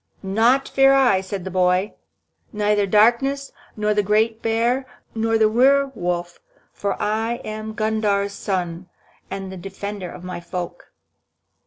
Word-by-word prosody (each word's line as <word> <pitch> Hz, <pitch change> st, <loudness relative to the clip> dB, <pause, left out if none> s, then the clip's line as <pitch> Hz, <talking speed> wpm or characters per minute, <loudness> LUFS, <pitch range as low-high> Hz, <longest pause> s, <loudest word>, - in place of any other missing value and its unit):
"Naught 230 Hz, +8 st, +2 dB
fear 270 Hz, 0 st, +5 dB
I," 255 Hz, -8 st, +4 dB
said 190 Hz, 0 st, -5 dB
the 190 Hz, -, -6 dB
boy, 185 Hz, +2 st, +2 dB, 0.6 s
"neither 210 Hz, -1 st, +1 dB
darkness, 240 Hz, +7 st, +3 dB, 0.3 s
nor 210 Hz, 0 st, +1 dB
the 210 Hz, -, +2 dB
great 220 Hz, +3 st, +1 dB
bear, 235 Hz, +4 st, 0 dB, 0.3 s
nor 225 Hz, 0 st, +1 dB
the 220 Hz, -1 st, +4 dB
were 270 Hz, +5 st, +3 dB
wolf. 175 Hz, -3 st, -3 dB, 0.3 s
For 200 Hz, -, -3 dB
I 220 Hz, +2 st, 0 dB
am 215 Hz, 0 st, -6 dB
Gundhar's 215 Hz, -2 st, 0 dB
son, 180 Hz, -3 st, -3 dB, 0.4 s
and 195 Hz, -1 st, -5 dB
the 190 Hz, -, -7 dB
defender 195 Hz, 0 st, -6 dB
of 175 Hz, -, -10 dB
my 180 Hz, -1 st, -5 dB
folk." 175 Hz, 0 st, -7 dB
210 Hz, 140 wpm, -22 LUFS, 190-225 Hz, 0.6 s, fear